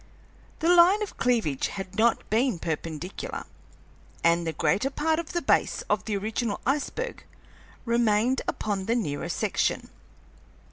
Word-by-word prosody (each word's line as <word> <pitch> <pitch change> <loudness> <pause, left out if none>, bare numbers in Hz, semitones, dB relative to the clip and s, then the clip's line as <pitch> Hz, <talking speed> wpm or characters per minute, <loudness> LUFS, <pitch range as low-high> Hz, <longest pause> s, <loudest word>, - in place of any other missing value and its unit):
The 345 +2 +5
line 365 +5 +6
of 410 - -7
cleavage 225 - +1
had 195 -1 -7
not 225 +2 +2
been 235 -1 +2
perpendicular, 165 +2 -5 0.8
and 170 0 +3
the - - 0
greater 195 - +1
part 315 +3 0
of 335 - -6
the 345 - -1
base - - +2
of 210 -3 +1
the 210 -2 -1
original 215 +1 -2
iceberg 300 - -2 0.6
remained 235 +1 +2
upon 200 -3 -2
the 230 - +2
nearer 150 -12 -2
section. - - -1
225 Hz, 135 wpm, -27 LUFS, 190-270 Hz, 0.8 s, line